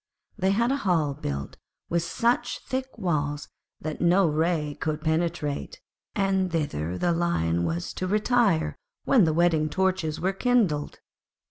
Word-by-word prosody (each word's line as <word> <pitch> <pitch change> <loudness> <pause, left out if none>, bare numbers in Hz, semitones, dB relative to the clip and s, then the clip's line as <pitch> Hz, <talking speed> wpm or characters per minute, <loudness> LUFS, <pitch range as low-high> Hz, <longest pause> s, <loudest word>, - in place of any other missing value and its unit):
They 190 - +1
had 235 +6 +2
a 275 - +1
hall 170 - +1
built 70 - -5 0.3
with 170 0 +1
such 240 +7 0
thick 260 -1 -4
walls 145 -7 -1 0.3
that 155 0 -5
no 180 +3 +4
ray 155 -1 0
could 155 -1 -1
penetrate, 160 - -1 0.4
and 190 -3 +1
thither 90 - -2
the 175 - +1
Lion 85 - +1
was 170 - -3
to 185 - -3
retire 210 -3 +2 0.3
when 230 -9 +5
the 160 - +2
wedding 160 -2 +2
torches 185 -3 0
were 190 +2 0
kindled. 195 -10 +1
170 Hz, 140 wpm, -26 LUFS, 150-195 Hz, 0.4 s, when